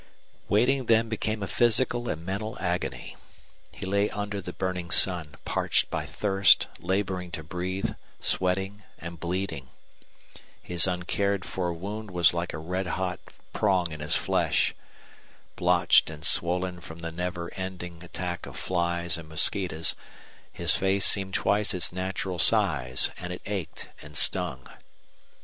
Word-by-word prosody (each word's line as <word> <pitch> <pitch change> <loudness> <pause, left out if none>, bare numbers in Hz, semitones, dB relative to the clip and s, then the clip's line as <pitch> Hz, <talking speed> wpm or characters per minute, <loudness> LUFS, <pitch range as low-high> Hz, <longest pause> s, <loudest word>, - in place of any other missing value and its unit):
Waiting 125 +4 +3
then 115 0 +4
became 110 -1 -2
a - - -3
physical 120 +1 +2
and 80 +2 -4
mental 100 +4 -3
agony. 90 -1 -3 0.5
He - - -7
lay 100 +2 +1
under 105 -1 -4
the 90 - -6
burning 90 -2 -3
sun, 85 -2 +3
parched - - +1
by - - -2
thirst, 100 -1 +4
laboring 95 -1 -1
to 80 - -4
breathe, 90 +4 -3 0.3
sweating 95 +3 -1 0.2
and 85 0 -8
bleeding. 85 -6 -3 0.9
His 90 0 +2
uncared 95 +2 -1
for 90 -2 -2
wound 100 +5 -6
was 85 -3 +4
like 85 +1 -2
a - - -5
red 90 +4 -3
hot 90 +1 -2 0.3
prong 95 -5 +2
in 75 - -7
his 75 +1 0
flesh. - - +1 0.8
Blotched - - +4
and 80 0 -7
swollen 90 +1 +2
from 85 0 -10
the 85 0 -4
never 85 0 -4
ending 90 -2 -6
attack 90 0 -5
of - - -9
flies 85 -2 -1
and 80 -1 -11
mosquitoes 80 +1 +2 0.6
his - - +1
face 95 0 +2
seemed 95 -1 +1
twice 105 0 +2
its 85 -1 0
natural 95 0 -3
size, 75 - +4
and 90 0 -5
it 90 - -6
ached 100 -5 -4
and 75 0 -7
stung. 75 -9 +2
90 Hz, 140 wpm, -27 LUFS, 85-100 Hz, 0.9 s, then